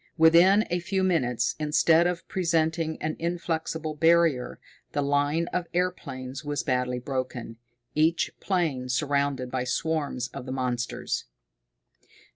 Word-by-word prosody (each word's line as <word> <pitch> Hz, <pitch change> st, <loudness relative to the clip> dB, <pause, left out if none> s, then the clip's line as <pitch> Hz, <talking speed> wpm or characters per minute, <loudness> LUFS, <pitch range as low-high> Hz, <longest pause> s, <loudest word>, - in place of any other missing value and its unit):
Within 175 Hz, +6 st, +6 dB
a 175 Hz, -, +1 dB
few 190 Hz, +2 st, -1 dB
minutes, 125 Hz, -10 st, +1 dB
instead 160 Hz, +3 st, +4 dB
of 175 Hz, -1 st, -3 dB
presenting 165 Hz, -2 st, 0 dB
an 155 Hz, 0 st, -1 dB
inflexible 160 Hz, -2 st, -2 dB
barrier, 160 Hz, -4 st, +2 dB, 0.3 s
the 145 Hz, -, 0 dB
line 145 Hz, +3 st, +1 dB
of 180 Hz, -1 st, -1 dB
airplanes 135 Hz, -7 st, -3 dB
was 145 Hz, 0 st, -2 dB
badly 125 Hz, -1 st, 0 dB
broken, 125 Hz, -3 st, -4 dB, 0.4 s
each 160 Hz, +2 st, +2 dB
plane 155 Hz, -10 st, -1 dB
surrounded 140 Hz, -2 st, 0 dB
by 130 Hz, -1 st, -1 dB
swarms 145 Hz, -2 st, -1 dB
of 125 Hz, -, -8 dB
the -, -, -4 dB
monsters. 125 Hz, -2 st, -2 dB
155 Hz, 120 wpm, -27 LUFS, 130-170 Hz, 0.4 s, Within